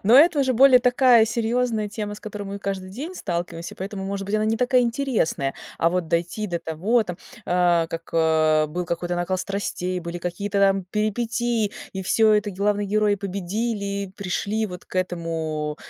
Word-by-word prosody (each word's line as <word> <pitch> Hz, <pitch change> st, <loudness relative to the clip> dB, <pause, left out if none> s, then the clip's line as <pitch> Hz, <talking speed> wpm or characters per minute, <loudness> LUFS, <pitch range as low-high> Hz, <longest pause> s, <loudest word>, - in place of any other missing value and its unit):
Но 220 Hz, +4 st, +5 dB
это 310 Hz, +2 st, +6 dB
уже 260 Hz, -1 st, +2 dB
более 255 Hz, +1 st, +7 dB
такая 245 Hz, -2 st, +5 dB
серьёзная 230 Hz, -1 st, 0 dB
тема, 205 Hz, 0 st, -5 dB
с 210 Hz, -, -12 dB
которой 210 Hz, -1 st, -6 dB
мы 200 Hz, 0 st, -5 dB
каждый 195 Hz, -1 st, -4 dB
день 290 Hz, -, -6 dB
сталкиваемся, 175 Hz, -, -4 dB
поэтому, 195 Hz, 0 st, -5 dB
может 195 Hz, 0 st, -4 dB
быть, 200 Hz, -, -2 dB
она 215 Hz, 0 st, +2 dB
не 220 Hz, +1 st, +1 dB
такая 250 Hz, +1 st, +3 dB
интересная, 235 Hz, -, 0 dB, 0.2 s
а 165 Hz, -, +3 dB
вот 180 Hz, -2 st, -1 dB
дойти 175 Hz, +6 st, -1 dB
до 175 Hz, -3 st, -2 dB
того 185 Hz, +9 st, +1 dB
там 180 Hz, -4 st, -6 dB, 0.3 s
а, 175 Hz, -2 st, +3 dB
как, 165 Hz, 0 st, -6 dB
э, 155 Hz, -1 st, +3 dB
был 175 Hz, +4 st, -3 dB
какой-то 175 Hz, +1 st, -2 dB
накал 175 Hz, +2 st, -1 dB
страстей, 185 Hz, -2 st, -3 dB
были 170 Hz, 0 st, -5 dB
какие-то 200 Hz, +4 st, -3 dB
там 195 Hz, -1 st, +3 dB
перипетии, 220 Hz, +2 st, -1 dB, 0.2 s
и 190 Hz, -, -4 dB
всё 215 Hz, +3 st, +4 dB
это 210 Hz, 0 st, +2 dB
главные 205 Hz, +1 st, 0 dB
герои 210 Hz, 0 st, +2 dB
победили, 200 Hz, +1 st, -3 dB
пришли 200 Hz, +3 st, -1 dB
вот 180 Hz, -3 st, -9 dB
к -, -, -15 dB
этому, 165 Hz, -4 st, -2 dB
200 Hz, 175 wpm, -23 LUFS, 175-220 Hz, 0.3 s, более